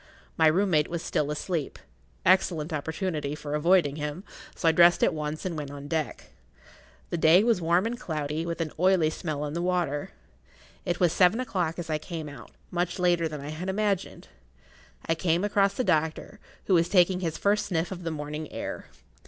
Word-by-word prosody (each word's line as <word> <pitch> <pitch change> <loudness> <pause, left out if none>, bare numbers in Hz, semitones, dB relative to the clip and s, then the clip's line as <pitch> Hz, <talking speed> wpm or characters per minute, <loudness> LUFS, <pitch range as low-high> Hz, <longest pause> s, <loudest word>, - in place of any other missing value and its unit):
My 160 - +4
room 190 +5 +2
mate 150 -2 +3
was 170 -1 -4
still 150 - -1
asleep—excellent 155 - -1
opportunity 155 -1 -3
for 150 -1 -6
avoiding 150 -1 +3
him, 150 +4 -4 0.3
so 165 - -1
I - - +7
dressed 170 +2 +5
at - - +3
once 150 +1 -4
and 180 -3 -2
went 150 -3 -5
on 145 0 -8
deck. 160 -1 -3 0.8
The 170 - -1
day 165 +5 +6
was 230 -6 +2
warm 170 +4 +2
and 240 +2 -3
cloudy, 155 -5 -3
with 170 0 -3
an 160 -2 -2
oily 180 -3 +3
smell 155 -4 -4
on 150 0 -4
the 170 - -2
water. 175 -5 -1 0.8
It 175 - -1
was 175 -3 +3
seven 190 +5 +4
o'clock 185 -10 -2
as 170 -2 -5
I 155 - 0
came 160 -1 -6
out—much 175 +6 -5
later 175 -2 +2
than 150 -2 -6
I 145 - -7
had 165 +5 -5
imagined. 200 -1 -2 0.8
I 165 - +1
came 170 +1 0
across 200 -1 +2
the 255 - 0
doctor, 160 +4 -1 0.3
who 195 - +1
was 170 -1 +3
taking 180 -1 +4
his 165 -3 -3
first 205 +1 +1
sniff 175 -1 -1
of 180 -2 -6
the 170 - -3
morning 150 0 -5
air. - - -6
165 Hz, 185 wpm, -27 LUFS, 150-180 Hz, 0.8 s, I